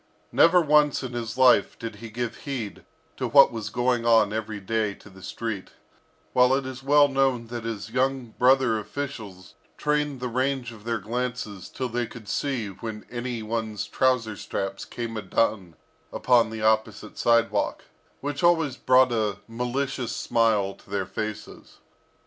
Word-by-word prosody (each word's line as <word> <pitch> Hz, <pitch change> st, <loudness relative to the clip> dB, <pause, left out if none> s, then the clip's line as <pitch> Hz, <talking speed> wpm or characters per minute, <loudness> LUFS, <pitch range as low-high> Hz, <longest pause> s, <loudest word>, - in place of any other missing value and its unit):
Never 175 Hz, +2 st, +6 dB
once 150 Hz, -2 st, +3 dB
in 125 Hz, -1 st, -5 dB
his 120 Hz, 0 st, -4 dB
life 125 Hz, -6 st, +5 dB
did 115 Hz, -1 st, -7 dB
he 115 Hz, -, -9 dB
give 120 Hz, +1 st, -4 dB
heed 120 Hz, -7 st, -4 dB, 0.3 s
to 130 Hz, -, -1 dB
what 140 Hz, +4 st, +7 dB
was 115 Hz, -3 st, -5 dB
going 120 Hz, -1 st, 0 dB
on 110 Hz, -3 st, +4 dB
every 110 Hz, -1 st, -4 dB
day 105 Hz, 0 st, -1 dB
to 100 Hz, -, -16 dB
the 95 Hz, 0 st, -15 dB
street; 110 Hz, -1 st, -5 dB, 0.6 s
while 125 Hz, +1 st, +5 dB
it 135 Hz, -1 st, -2 dB
is 130 Hz, -1 st, -7 dB
well 145 Hz, +1 st, +5 dB
known 135 Hz, -3 st, +1 dB
that 120 Hz, -1 st, -5 dB
his 110 Hz, -1 st, -5 dB
young 130 Hz, -2 st, -1 dB
brother 125 Hz, -3 st, +4 dB
officials 105 Hz, -7 st, -7 dB, 0.2 s
trained 150 Hz, -2 st, 0 dB
the 125 Hz, -, -3 dB
range 130 Hz, 0 st, -1 dB
of 110 Hz, -2 st, -14 dB
their 115 Hz, -1 st, 0 dB
glances 115 Hz, -2 st, -4 dB
till 130 Hz, -, -3 dB
they 120 Hz, 0 st, -2 dB
could 115 Hz, -2 st, -12 dB
see 125 Hz, -1 st, -2 dB
when 105 Hz, +2 st, -7 dB
any 120 Hz, -1 st, -4 dB
one's 110 Hz, -1 st, -3 dB
trouser 125 Hz, -5 st, +1 dB
straps 95 Hz, 0 st, -4 dB
came 115 Hz, -2 st, -5 dB
undone 100 Hz, -4 st, -1 dB, 0.4 s
upon 120 Hz, -3 st, +3 dB
the 110 Hz, -1 st, -6 dB
opposite 110 Hz, 0 st, 0 dB
sidewalk, 115 Hz, -1 st, +1 dB, 0.4 s
which 145 Hz, 0 st, -3 dB
always 165 Hz, -6 st, +3 dB
brought 130 Hz, 0 st, +4 dB
a 110 Hz, -3 st, 0 dB
malicious 125 Hz, +1 st, -2 dB
smile 110 Hz, -4 st, +1 dB
to -, -, -21 dB
their 100 Hz, -1 st, -1 dB
faces. 110 Hz, +1 st, -7 dB
115 Hz, 160 wpm, -25 LUFS, 110-130 Hz, 0.6 s, what